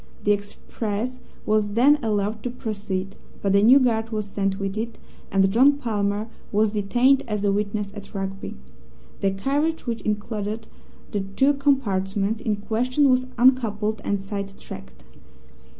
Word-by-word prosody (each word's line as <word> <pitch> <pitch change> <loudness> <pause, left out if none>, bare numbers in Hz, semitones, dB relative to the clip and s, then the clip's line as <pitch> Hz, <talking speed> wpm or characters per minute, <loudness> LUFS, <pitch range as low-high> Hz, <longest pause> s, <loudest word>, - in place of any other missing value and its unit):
The 205 - +3
express 210 +3 -3 0.3
was 210 -1 +1
then 275 +5 +5
allowed 210 0 0
to 245 - -3
proceed, 205 -5 -4 0.3
but 200 -1 +2
a 200 - +6
new 240 +6 +8
guard 225 -4 +2
was 215 -2 -2
sent 195 -1 -1
with 195 0 -3
it, 225 +1 -4 0.3
and 195 0 +3
John 260 +7 +6
Palmer 210 -5 -1 0.2
was 215 0 +2
detained 240 +6 +3
as 210 -2 -2
a 200 - +3
witness 205 0 -1
at 205 +1 -10
Rugby. 195 0 -4 0.6
The 195 - +2
carriage 285 +11 -1
which 235 -2 -2
included 210 +1 -3 0.5
the 205 - -1
two 200 +9 +2
compartments 215 -7 0
in 215 -2 0
question 250 +7 +1
was 255 0 +2
uncoupled 225 -4 +2
and 200 - 0
side 195 0 -5
tracked. 65 0 -10
210 Hz, 150 wpm, -24 LUFS, 200-240 Hz, 0.6 s, new